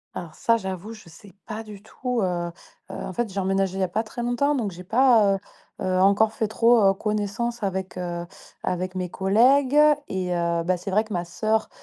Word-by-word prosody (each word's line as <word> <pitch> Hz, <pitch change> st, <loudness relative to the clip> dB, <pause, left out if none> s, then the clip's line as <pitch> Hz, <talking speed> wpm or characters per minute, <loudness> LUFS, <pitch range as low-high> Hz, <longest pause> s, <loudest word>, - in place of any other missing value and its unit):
Alors 165 Hz, -3 st, -6 dB
ça, 230 Hz, +6 st, +2 dB
j'avoue, 190 Hz, +1 st, -6 dB
je 215 Hz, -5 st, -14 dB
sais 175 Hz, +4 st, -15 dB
pas 215 Hz, 0 st, -5 dB
du 210 Hz, -2 st, -11 dB
tout, 250 Hz, -2 st, -3 dB
heu -, -, +3 dB
heu, 175 Hz, -1 st, -2 dB, 0.4 s
en -, -, -6 dB
fait, 235 Hz, 0 st, -2 dB
j'ai 195 Hz, -, -3 dB
emménagé 195 Hz, 0 st, 0 dB
il -, -, -3 dB
y -, -, +3 dB
a -, -, +1 dB
pas 195 Hz, +5 st, -1 dB
très 235 Hz, +2 st, -6 dB
longtemps, 280 Hz, +5 st, +1 dB
donc 220 Hz, -7 st, -1 dB
j'ai 180 Hz, +1 st, -10 dB
pas, 225 Hz, -1 st, +4 dB
heu -, -, -2 dB, 0.5 s
heu, 185 Hz, 0 st, +1 dB
encore 200 Hz, +3 st, +4 dB
fait 220 Hz, 0 st, -1 dB
trop, 230 Hz, +2 st, +4 dB
heu, 195 Hz, 0 st, +5 dB
connaissance 215 Hz, +3 st, -2 dB
avec, 190 Hz, -2 st, -3 dB
heu, 175 Hz, -1 st, -4 dB, 0.4 s
avec 185 Hz, +1 st, -2 dB
mes 180 Hz, -1 st, -3 dB
collègues. 255 Hz, +8 st, +3 dB, 0.3 s
Et 185 Hz, -1 st, -2 dB
heu, 170 Hz, -1 st, 0 dB
bah, 180 Hz, +2 st, +1 dB
c'est 180 Hz, +3 st, -6 dB
vrai 210 Hz, +3 st, +2 dB
que 215 Hz, -1 st, -8 dB
ma 175 Hz, -1 st, -2 dB
sœur, 220 Hz, +5 st, -1 dB
195 Hz, 220 wpm, -24 LUFS, 185-225 Hz, 0.5 s, heu